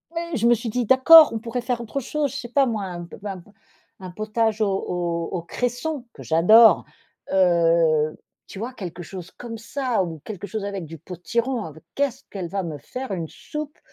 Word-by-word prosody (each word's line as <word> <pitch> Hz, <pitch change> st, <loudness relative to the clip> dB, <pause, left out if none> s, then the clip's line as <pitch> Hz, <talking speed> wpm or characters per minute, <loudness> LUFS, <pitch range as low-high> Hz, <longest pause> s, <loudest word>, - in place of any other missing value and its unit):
Oui, 335 Hz, -, 0 dB, 0.2 s
je 230 Hz, -, +2 dB
me 240 Hz, -, +6 dB
suis 235 Hz, +1 st, -2 dB
dit: 245 Hz, +2 st, -1 dB
«D'accord, 275 Hz, +5 st, +8 dB
on 225 Hz, -, -2 dB
pourrait 235 Hz, +2 st, -4 dB
faire 240 Hz, 0 st, -2 dB
autre 235 Hz, +4 st, -4 dB
chose, 285 Hz, +1 st, -2 dB
je 280 Hz, -, -5 dB
sais 240 Hz, -, -6 dB
pas 275 Hz, +2 st, +3 dB
moi 220 Hz, -4 st, -2 dB
un 175 Hz, -2 st, -6 dB
p 170 Hz, -, -12 dB
un 195 Hz, -3 st, -5 dB
p 190 Hz, +4 st, -18 dB, 0.5 s
un 185 Hz, -1 st, -8 dB
potage 215 Hz, +2 st, -1 dB
au 215 Hz, -, +3 dB
au 175 Hz, -3 st, -2 dB
au 180 Hz, -, -2 dB
cresson- 245 Hz, -, -3 dB
que -, -, -11 dB
j'adore- 215 Hz, +8 st, +6 dB, 0.5 s
heu, 165 Hz, -4 st, +3 dB, 0.3 s
tu -, -, -10 dB
vois? 235 Hz, +5 st, -5 dB
Quelque 175 Hz, -5 st, -7 dB
chose 185 Hz, +1 st, -9 dB
comme 235 Hz, -2 st, -8 dB
ça 235 Hz, -2 st, -1 dB
ou 165 Hz, -3 st, -6 dB
quelque 205 Hz, -2 st, -7 dB
chose 215 Hz, +2 st, -4 dB
avec 200 Hz, -3 st, -4 dB
du 165 Hz, +1 st, -9 dB
potiron. 220 Hz, -, -3 dB
Avec 160 Hz, 0 st, -11 dB
qu'est-ce 275 Hz, -2 st, -1 dB
qu'elle 190 Hz, -4 st, -5 dB
va 195 Hz, +3 st, -3 dB
me 160 Hz, -4 st, -5 dB
faire 255 Hz, -, -7 dB
une 170 Hz, -4 st, -3 dB
soupe 300 Hz, -, -7 dB
210 Hz, 205 wpm, -23 LUFS, 175-245 Hz, 0.5 s, D'accord